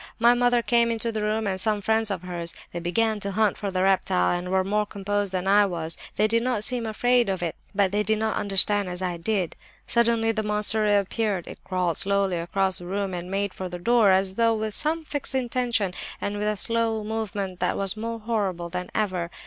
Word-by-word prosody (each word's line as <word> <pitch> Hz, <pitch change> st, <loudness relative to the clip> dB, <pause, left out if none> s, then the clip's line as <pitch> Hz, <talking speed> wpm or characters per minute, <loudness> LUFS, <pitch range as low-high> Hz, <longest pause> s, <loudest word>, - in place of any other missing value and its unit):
My 235 Hz, +1 st, +5 dB
mother 245 Hz, -1 st, +2 dB
came 235 Hz, -1 st, +3 dB
into 230 Hz, 0 st, 0 dB
the 220 Hz, -1 st, -3 dB
room, 215 Hz, +1 st, 0 dB
and 190 Hz, -2 st, -2 dB
some 215 Hz, 0 st, +1 dB
friends 220 Hz, +2 st, +1 dB
of 185 Hz, -3 st, -3 dB
hers. 170 Hz, -2 st, -3 dB, 0.2 s
They 175 Hz, -, -3 dB
began 215 Hz, +5 st, 0 dB
to 200 Hz, -1 st, -4 dB
hunt 215 Hz, 0 st, +2 dB
for 200 Hz, -, -4 dB
the 185 Hz, -1 st, 0 dB
reptile 185 Hz, -, +2 dB
and 175 Hz, +1 st, -4 dB
were 190 Hz, 0 st, +2 dB
more 210 Hz, +2 st, 0 dB
composed 205 Hz, -1 st, -2 dB
than 185 Hz, 0 st, -2 dB
I 205 Hz, +1 st, +5 dB
was; 165 Hz, -3 st, -3 dB, 0.2 s
they 215 Hz, -, +3 dB
did 230 Hz, +1 st, +1 dB
not 240 Hz, -4 st, -1 dB
seem 245 Hz, 0 st, -1 dB
to -, -, -3 dB
be -, -, -2 dB
afraid 245 Hz, +1 st, +2 dB
of 190 Hz, -2 st, -2 dB
it. 165 Hz, -, -2 dB, 0.2 s
But 195 Hz, -2 st, +2 dB
they 205 Hz, +1 st, +1 dB
did 220 Hz, +1 st, +2 dB
not 220 Hz, 0 st, -1 dB
understand 200 Hz, 0 st, +3 dB
as 180 Hz, +1 st, -5 dB
I 180 Hz, -2 st, -2 dB
did. 185 Hz, -1 st, -1 dB, 0.3 s
"Suddenly 230 Hz, -1 st, +2 dB
the 220 Hz, -1 st, -1 dB
monster 210 Hz, +1 st, +1 dB
reappeared; 205 Hz, -2 st, +1 dB
it -, -, -11 dB
crawled 180 Hz, -3 st, -1 dB
slowly 200 Hz, -2 st, +1 dB
across 190 Hz, +2 st, 0 dB
the 175 Hz, -, -9 dB
room 195 Hz, 0 st, -2 dB
and 175 Hz, 0 st, -5 dB
made 195 Hz, 0 st, -1 dB
for 185 Hz, -1 st, -5 dB
the 175 Hz, -, -6 dB
door, 230 Hz, +2 st, +4 dB
as 190 Hz, 0 st, +3 dB
though 230 Hz, +2 st, +2 dB
with 215 Hz, -1 st, -3 dB
some 315 Hz, +5 st, 0 dB
fixed 285 Hz, -2 st, -2 dB
intention, 240 Hz, -6 st, 0 dB, 0.3 s
and 205 Hz, -, -3 dB
with 210 Hz, +1 st, -2 dB
a 210 Hz, 0 st, 0 dB
slow 230 Hz, 0 st, 0 dB
movement 205 Hz, -4 st, -4 dB
that -, -, 0 dB
was 195 Hz, 0 st, -1 dB
more 230 Hz, +1 st, -4 dB
horrible 195 Hz, -6 st, -2 dB
than 180 Hz, +1 st, -5 dB
ever. 185 Hz, -5 st, -1 dB
205 Hz, 230 wpm, -25 LUFS, 185-225 Hz, 0.3 s, My